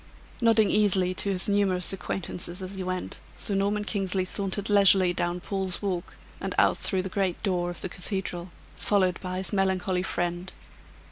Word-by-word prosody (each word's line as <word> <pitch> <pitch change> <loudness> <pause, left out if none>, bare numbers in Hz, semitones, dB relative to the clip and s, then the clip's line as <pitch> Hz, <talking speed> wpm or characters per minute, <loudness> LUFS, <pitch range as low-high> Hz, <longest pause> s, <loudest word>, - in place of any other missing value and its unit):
Nodding 225 -3 +4
easily 190 -3 +3
to 200 - 0
his 190 -2 +2
numerous 195 -3 +2
acquaintances 180 -1 -4
as 185 +1 -6
he 190 - -5
went, 185 0 -4 0.2
Sir 205 - -3
Norman 200 +2 +1
Kingsley 195 -3 -1
sauntered 195 +2 -2
leisurely 195 -3 +6
down 175 0 -1
Paul's 190 0 -1
Walk, 185 -4 -4 0.2
and - - -4
out - - +4
through 190 -2 0
the - - -3
great 190 -2 -2
door 180 -3 0
of 175 - -7
the 190 - -4
cathedral, 180 -1 -4 0.3
followed 185 -3 +1
by 185 -1 -4
his 190 +3 0
melancholy 190 -2 +1
friend. 175 0 -2
190 Hz, 165 wpm, -27 LUFS, 180-200 Hz, 0.3 s, leisurely